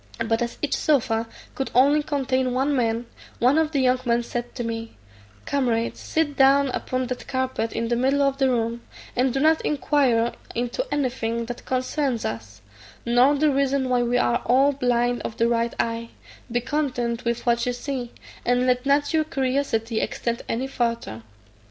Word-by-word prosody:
But 225 +1 0
as 235 0 -3
each 295 - +1
sofa 230 -6 +1 0.3
could 270 - -3
only 285 +4 +5
contain 260 -3 -1
one 275 +3 +1
man, 230 -1 0 0.3
one 260 +6 +4
of 315 -1 +1
the 280 -4 +1
young 255 0 +3
men 240 -1 +1
said 240 0 -5
to 245 - -3
me, 225 - -5 0.5
"Comrade, 235 -5 0
sit 315 -3 -1
down 275 +1 +5
upon 255 0 -2
that 250 0 -5
carpet 260 -4 -1
in 230 - -2
the 240 - +2
middle 270 +4 +2
of 275 0 0
the 270 -1 +3
room, 235 -1 -1 0.3
and 255 +1 +2
do 270 - -1
not 315 +2 +4
inquire 265 -6 +2 0.2
into 245 - -2
anything 235 -4 -1
that 245 +1 -7
concerns 255 -1 -1
us, 110 -4 -6 0.4
nor 245 +4 +4
the 300 +1 +3
reason 275 -1 +1
why 250 -1 +2
we 240 +1 +1
are 240 -1 +1
all 270 +3 +5
blind 245 -2 0
of 225 - -6
the 230 - +3
right 235 0 0
eye; 230 0 -1 0.4
be 240 +1 +1
content 245 -4 -2
with 235 -1 -2
what 235 0 +2
you - - +2
see, 245 -1 -4 0.3
and 245 +1 +2
let 250 +1 +1
not 285 +2 +2
your 315 -1 +3
curiosity 260 -6 -1
extend 235 0 -2
any 240 +3 -1
farther." 235 - -2
250 Hz, 175 wpm, -24 LUFS, 235-275 Hz, 0.5 s, only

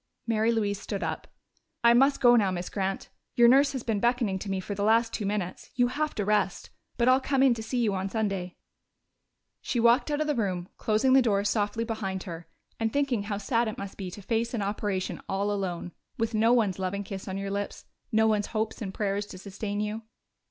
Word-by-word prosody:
Mary 225 0 +2
Louise 205 -3 0
stood 200 -1 -4
up. - - -4 0.6
"I 235 0 +7
must 270 +4 +4
go 245 -1 +7
now, 205 -5 +3
Miss 180 -1 -3
Grant. 195 -1 -2 0.3
Your 240 -1 +7
nurse 275 +3 +5
has 260 -3 -4
been 220 -3 0
beckoning 235 -4 +1
to 200 - -6
me 195 -1 -1
for 195 +2 -5
the 200 0 -2
last 225 +2 +3
two 210 - -2
minutes. 200 -3 -3
You 245 -1 +3
have 300 +4 -2
to 205 - -1
rest.... 210 -2 0 0.3
But 240 0 +2
I'll 260 +1 +5
come 270 0 +2
in 265 -3 +6
to 230 - -5
see 225 +3 -3
you 210 -3 +1
on 190 0 -2
Sunday." 195 -5 -2 1.0
She 245 - -1
walked 235 +5 +4
out 295 0 0
of 310 - +1
the 300 - +1
room, 190 -7 -2
closing 220 +4 +2
the 265 - +7
door 200 -5 +2
softly 210 +2 0
behind 195 -5 -3
her 170 -2 -8 0.3
and 225 -1 0
thinking 275 -5 +1
how 205 0 -3
sad 230 +3 0
it 215 - -4
must 200 -1 -6
be 190 -2 -5
to 200 +3 -10
face 230 +3 -1
an 210 - -1
operation 200 -2 -2
all 200 +2 0
alone, 180 -3 -3 0.3
with 225 0 -1
no 220 +2 +3
one's 215 -6 +2
loving 190 +2 -2
kiss 195 0 -7
on 190 0 -3
your 195 0 -4
lips, 200 0 -4 0.3
no 220 0 +4
one's 210 -2 +2
hopes 220 +1 -2
and 195 -3 -5
prayers 205 0 -1
to 185 - -9
sustain 200 +2 -5
you. 210 +1 -2
210 Hz, 220 wpm, -28 LUFS, 195-235 Hz, 1.0 s, I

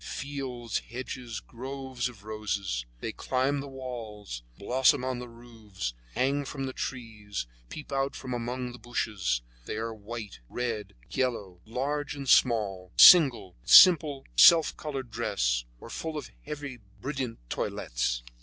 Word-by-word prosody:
fields, 130 -5 -4
hedges, 120 -1 -5
groves 130 0 -5
of 110 -5 -15
roses. 100 - -3
They - - -3
climb 130 +2 0
up - - -2
the 140 - -7
walls, 115 - -7 0.2
blossom 125 +4 +3
on 130 -1 -2
the 125 0 -7
roofs, 110 - -7 0.2
hang 140 +2 +1
from 135 0 -5
the 130 -1 -3
trees, 110 - -5 0.2
peep 150 - -9
out 135 0 0
from 130 -2 -5
among 125 +1 -3
the 120 - -11
bushes; 105 - -1 0.2
they - - -3
are 115 +1 -3
white, 110 0 -8
red, 115 -5 -3 0.2
yellow, 100 -9 -2
large 140 +6 -2
and 140 -1 -6
small, 100 -8 +3
single, 135 - +8
with 75 - -12
a - - +5
simple 155 -7 +8
self 165 -3 +7
colored 135 -5 -5
dress, 80 - 0
or - - -11
full 160 -1 -4
and 150 - -7
heavy 145 -2 -5
in 120 - -14 0.2
brilliant 135 -4 -3
toilettes. - - -2
120 Hz, 150 wpm, -29 LUFS, 105-135 Hz, 0.2 s, single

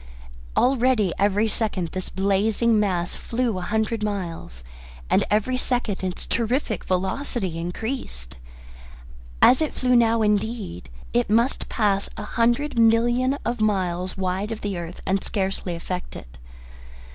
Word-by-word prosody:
Already 250 -7 +3
every 205 +2 +3
second 205 -6 -1
this 185 +1 -5
blazing 210 +4 +2
mass 180 -4 0
flew 235 -5 -2
a - - -5
hundred 220 +3 -1
miles, 175 - -4 0.5
and - - +4
every 215 +5 +1
second 240 -7 -1
its 185 -1 -3
terrific 230 - 0
velocity 190 - -1
increased. 170 - -5 1.1
As 260 - +7
it 310 - -1
flew 250 -1 +2
now, 230 -1 +4
indeed, 210 - -1 0.2
it 120 - +2
must 230 +5 +2
pass 200 -3 +1
a - - -4
hundred 240 +3 +1
million 240 +4 +3
of 235 -1 -1
miles, 185 -3 0
wide 190 +3 -1
of 225 - -4
the 205 -2 -2
earth 170 0 -6
and 195 +1 0
scarcely 190 -3 -2
affect 180 +2 -5
it. - - -11
210 Hz, 135 wpm, -24 LUFS, 185-235 Hz, 1.1 s, As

